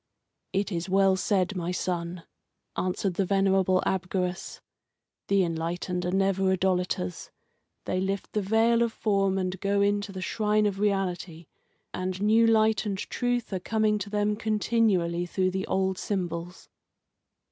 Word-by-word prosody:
"It 195 +2 -1
is 175 +1 -3
well 195 0 +4
said, 190 0 0
my 175 -1 -2
son," 175 -1 -3 0.5
answered 185 +1 -1
the 195 - 0
venerable 190 -1 +2
Abgarus. 185 -1 -2 0.7
"The 195 -1 +3
enlightened 175 +2 -2
are - - -1
never 195 0 +2
idolaters. 180 - -1 0.6
They 185 - -1
lift 195 +1 -2
the 210 - +1
veil 225 +4 +3
of 235 -1 +2
form 195 -3 +1
and 185 -1 -2
go 200 0 +1
in 205 0 +2
to 205 0 -7
the 190 - -7
shrine 215 0 +1
of 200 -2 -1
reality, 185 -5 -1 0.5
and 185 0 -3
new 220 +3 +4
light 220 -1 +3
and 195 -2 -2
truth 245 +2 -2
are 190 - -1
coming 215 +2 +1
to 200 0 -5
them 210 0 0
continually 210 -6 +1
through 185 +1 0
the 190 +1 -3
old 190 -1 0
symbols." 175 -2 -4
190 Hz, 145 wpm, -27 LUFS, 180-205 Hz, 0.7 s, well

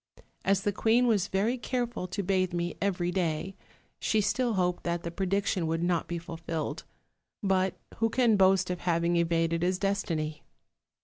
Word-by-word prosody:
As 195 0 +2
the 205 - +1
queen 230 +5 +3
was 210 -6 +2
very 220 +6 0
careful 240 -6 -2
to 200 +3 -3
bathe 185 -1 +1
me 175 0 -2
every 180 -3 0
day, 180 +1 -1 0.4
she 220 - +1
still 235 +4 +1
hoped 180 -1 +1
that 170 0 -2
the 170 - -4
prediction 190 -1 0
would 165 +1 -1
not 175 -1 +1
be 175 - -3
fulfilled; 165 -1 -5 0.6
but 190 -1 +2 0.2
who 225 0 +2
can 235 -1 +3
boast 190 -1 +4
of 180 - -3
having 170 0 +1
evaded 165 -1 +1
his 180 +1 +1
destiny? 170 -6 -1
185 Hz, 165 wpm, -29 LUFS, 170-200 Hz, 0.6 s, boast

